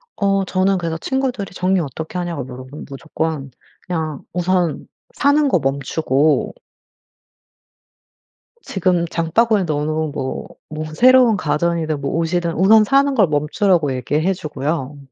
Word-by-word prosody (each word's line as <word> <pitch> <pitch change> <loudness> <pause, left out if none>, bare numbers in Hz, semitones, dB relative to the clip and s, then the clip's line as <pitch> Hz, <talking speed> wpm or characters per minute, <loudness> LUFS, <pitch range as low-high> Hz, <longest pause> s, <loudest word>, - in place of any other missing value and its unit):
어 195 -1 +1
저는 190 +1 +1
그래서 165 -2 -3
친구들이 255 -3 -2
정리 185 +1 +1
어떻게 160 +3 -5
하냐고 170 -6 -3
물어보면 130 +3 -9
무조건 150 0 -4 0.3
그냥 160 -5 -3
우선 180 -2 0 0.3
사는 290 - +3
거 180 - +2
멈추고 140 +2 0 2.1
지금 180 -2 0
장바구니에 200 +6 +1
넣어놓은 155 0 -1
뭐 135 -2 -4 0.2
뭐 155 0 -5
새로운 250 -2 +6
가전이든 155 -1 -1
뭐 140 - -2
옷이든 170 +1 0
우선 215 +5 +6
사는 275 +4 +2
걸 205 -7 +4
멈추라고 150 0 +1
얘기해 150 +9 0
주고요. 150 -3 -4
165 Hz, 295 characters per minute, -19 LUFS, 150-195 Hz, 2.1 s, 새로운